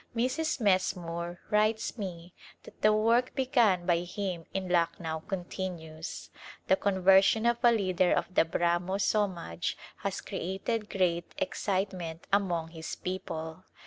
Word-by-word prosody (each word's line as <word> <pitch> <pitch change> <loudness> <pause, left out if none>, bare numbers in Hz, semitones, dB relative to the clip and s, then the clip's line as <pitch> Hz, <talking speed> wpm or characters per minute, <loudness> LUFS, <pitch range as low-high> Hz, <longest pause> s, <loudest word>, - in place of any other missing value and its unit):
Mrs. 260 +7 0
Messmore 175 -4 0
writes 215 +1 +2
me 180 -5 -6 0.3
that - - -15
the 215 - +6
work 230 +4 +2
begun 240 -10 +3
by 175 -2 +3
him 180 -1 -4
in 190 -1 -3
Lucknow 170 -2 0
continues. 175 -4 -5 0.3
The 190 - +4
conversion 195 +3 +4
of 235 0 +3
a 240 -1 +6
leader 185 -5 +2
of 185 - 0
the - - +5
Brahmo 175 +3 0
Somaj 190 - 0 0.2
has - - -3
created 205 +4 -3
great 175 -3 0
excite 200 -9 -1
ment 165 -2 -6
among 175 -5 +1
his 160 -1 -6
people. 165 -2 -5
185 Hz, 130 wpm, -30 LUFS, 170-210 Hz, 0.3 s, the